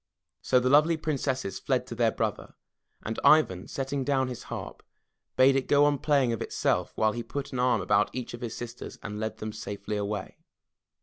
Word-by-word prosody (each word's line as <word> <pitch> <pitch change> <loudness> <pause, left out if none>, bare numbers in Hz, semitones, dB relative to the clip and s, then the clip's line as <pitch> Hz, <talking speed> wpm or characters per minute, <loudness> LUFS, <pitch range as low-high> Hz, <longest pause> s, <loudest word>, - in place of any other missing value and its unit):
So 130 - +3
the 125 - 0
lovely 150 +5 +5
Princesses 135 -8 -2
fled - - 0
to - - -7
their - - +2
brother, - - -3 0.5
and 110 +1 -3
Ivan, 95 -13 +4
setting 135 0 -3
down 130 -2 +1
his 125 - -6
harp, - - -6 0.5
bade 130 +1 +5
it 135 - 0
go 145 0 +5
on 145 -2 +2
playing 140 -5 +2
of 115 - -4
itself - - 0
while 110 0 +2
he 120 - -4
put 140 +4 -6
an 125 - -2
arm 125 0 +2
about 105 0 +2
each 125 -2 -5
of 120 - -8
his 120 -2 -5
sisters 120 0 -7
and 105 0 -5
led 110 0 -3
them 110 0 -5
safely 105 -1 -5
away. 105 0 -4
125 Hz, 195 wpm, -28 LUFS, 110-140 Hz, 0.5 s, lovely